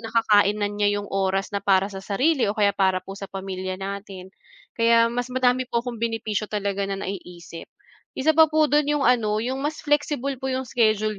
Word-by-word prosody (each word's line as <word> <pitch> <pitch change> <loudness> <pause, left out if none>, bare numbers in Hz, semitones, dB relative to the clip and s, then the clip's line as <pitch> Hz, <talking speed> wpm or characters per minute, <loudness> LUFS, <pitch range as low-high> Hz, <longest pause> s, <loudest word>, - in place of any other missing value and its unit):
nakakain 215 -3 +2
na 205 - +1
niya 205 0 +1
'yong 205 - -9
oras 195 0 0
na 200 - 0
para 195 0 +2
sa 195 - -6
sarili 260 +6 +1
o 205 - -1
kaya 205 -1 +3
para 190 -2 +1
po 195 - -9
sa 195 - -7
pamilya 190 -1 -5
natin. 195 -1 -7 0.5
Kaya 230 0 +4
mas 245 0 -2
madami 255 0 +2
po 235 - 0
akong 245 -2 -6
benepisyo 225 -2 -2
talaga 200 -1 -2
na 195 0 -4
naiisip. 175 -3 -8 0.5
Isa 300 +4 +2
pa 320 0 +6
po 310 -1 +2
do'n 295 0 +3
'yong 295 -2 +1
ano, 220 -4 +2
'yong 260 +2 -3
mas 295 +2 -3
flexible 290 -2 0
po 265 - -3
'yong 260 0 -2
schedule 215 -3 +1
215 Hz, 200 wpm, -24 LUFS, 195-255 Hz, 0.5 s, pa